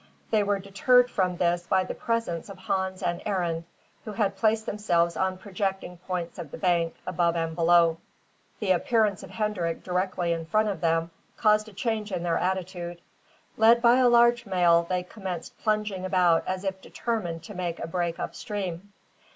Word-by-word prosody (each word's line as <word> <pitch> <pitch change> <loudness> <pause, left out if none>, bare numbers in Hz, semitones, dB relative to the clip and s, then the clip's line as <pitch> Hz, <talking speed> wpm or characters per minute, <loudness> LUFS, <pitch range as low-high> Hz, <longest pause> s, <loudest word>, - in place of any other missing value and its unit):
They 215 -2 +4
were 205 0 +1
deterred 245 +6 +3
from 180 -2 0
this 175 0 0
by 190 -1 +3
the - - -5
presence 230 -7 -2
of 195 - -9
Hans 190 0 -2
and 175 -1 -1
Arend, 175 -5 -1 0.4
who 215 - -6
had 200 -2 0
placed 220 +2 +1
themselves 170 -5 +1
on 190 0 0
projecting 190 -2 -3
points 180 -1 -5
of 165 -4 -6
the - - -8
bank, 170 -3 +1
above 175 -2 +1
and 165 -1 -1
below. 170 -1 +4 0.6
The 205 -4 0
appearance 210 +2 +2
of - - -10
Hendrik 200 -6 -2
directly 180 -1 -1
in 165 -1 -5
front 215 +5 +2
of 190 -5 -4
them 165 0 +1 0.3
caused 215 0 +3
a - - -16
change 215 0 -2
in 180 -2 -2
their 170 -1 +1
attitude. 180 -2 -3 0.6
Led 225 +2 +6
by 235 +1 +5
a 255 -1 +5
large 235 -1 +4
male, 170 -3 +3
they 180 -1 0
commenced 185 -3 -7
plunging 210 -3 -1
about 180 -3 +3
as 185 +1 -2
if 190 -1 -3
determined 180 -10 -3
to 205 - -9
make 175 -3 -3
a - - -4
break 170 0 -2
up - - -4
stream. 200 -2 -5
185 Hz, 180 wpm, -27 LUFS, 175-210 Hz, 0.6 s, Led